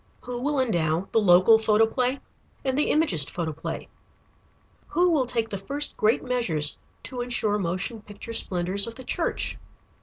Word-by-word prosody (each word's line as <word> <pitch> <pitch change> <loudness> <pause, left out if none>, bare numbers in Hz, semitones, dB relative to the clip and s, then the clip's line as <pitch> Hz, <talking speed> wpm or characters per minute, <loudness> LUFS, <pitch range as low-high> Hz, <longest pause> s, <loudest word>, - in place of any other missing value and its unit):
Who 245 -1 -6
will 290 +1 0
endow 175 -7 0
the 225 - +3
local 185 +3 +6
photoplay 225 +5 +2 0.5
and 260 -1 0
the 295 - +1
Imagist 185 - +3
photoplay? 160 -2 -5 1.0
Who 355 +1 +2
will 275 -6 +2
take 230 -2 -2
the 200 - -4
first 285 +9 -1
great 215 +2 +2
measures 180 -13 0 0.2
to 250 -1 -5
insure 225 -4 0
motion 185 +5 -3
picture 210 +3 -9
splendors 190 0 +1
in 230 - -7
the 260 - -10
church? 330 +6 -2
225 Hz, 150 wpm, -25 LUFS, 185-255 Hz, 1.0 s, local